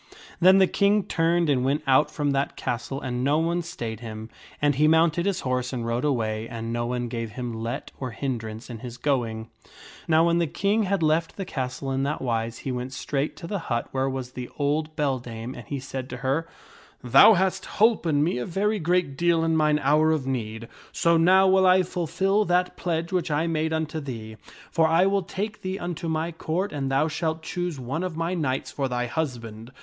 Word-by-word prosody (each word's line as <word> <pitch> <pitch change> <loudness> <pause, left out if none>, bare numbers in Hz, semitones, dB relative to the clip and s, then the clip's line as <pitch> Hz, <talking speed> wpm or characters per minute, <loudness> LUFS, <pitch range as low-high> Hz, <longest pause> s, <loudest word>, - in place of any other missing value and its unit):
Then 185 +2 +7
the 190 - +6
King 200 +2 +2
turned 165 +1 +1
and 135 -4 +2
went 140 +3 0
out 135 +2 +4
from 145 -2 -1
that 140 0 -1
castle 120 +3 -3
and 125 -2 -3
no 145 +3 +3
one 170 +2 +1
stayed 120 -10 -6
him, 110 -1 -8 0.3
and 145 0 +3
he 150 +3 +3
mounted 165 +3 +3
his 195 -2 0
horse 125 -1 -1
and 120 -3 -3
rode 115 +1 -1
away, 115 -6 -1
and 115 0 -5
no 120 0 -1
one 120 0 -2
gave 115 -2 -5
him 125 -1 -4
let 115 +4 -4
or 130 - -3
hindrance 115 -3 -4
in 120 -3 -7
his 120 0 -8
going. 115 -5 -1 0.6
Now 160 0 +4
when 170 0 +3
the 170 - +1
King 200 +8 +1
had 195 -4 +1
left 160 +2 +1
the 195 - -4
castle 135 -3 -4
in 135 0 0
that 145 +2 -1
wise, 115 -2 -2
he 135 - -1
went 125 +1 -4
straight 140 +2 -2
to - - -8
the 200 +3 -3
hut 120 0 -1
where 135 0 0
was 130 -2 -5
the 125 -1 -7
old 150 +2 -1
beldame 125 -5 -2
and 120 -5 -10
he 140 - -3
said 130 0 -6
to 125 - -6
her, 155 +5 0 0.3
" - - -21 0.2
Thou 135 - +8
hast 190 +1 0
holpen 180 -9 +3
me 155 -6 0
a 120 - -3
very 205 +4 0
great 175 -4 +1
deal 170 +2 +2
in 165 0 +2
mine 150 -1 +3
hour 155 +3 +4
of 155 -4 0
need, 115 -3 -3 0.2
so 170 0 +2
now 185 +4 +5
will 190 0 +5
I 185 0 +5
fulfil 185 +4 0
that 180 0 +1
pledge 170 -1 -2
which 180 -4 0
I 150 +2 +1
made 160 -1 0
unto 160 0 -2
thee, 115 -6 -7 0.3
for 165 -1 +3
I 165 +3 +4
will 195 0 +2
take 205 +4 -5
thee 185 +1 -3
unto 175 -2 -4
my 160 +1 -1
Court 170 +4 -2
and 135 -2 -2
thou 135 +3 +2
shalt 160 0 -2
choose 175 -3 -3
one 130 +6 -3
of 180 -3 -4
my 165 +2 -1
knights 135 -6 -2
for 135 0 -2
thy 125 -1 -1
husband. 120 -4 -4
150 Hz, 215 wpm, -25 LUFS, 125-170 Hz, 0.6 s, Thou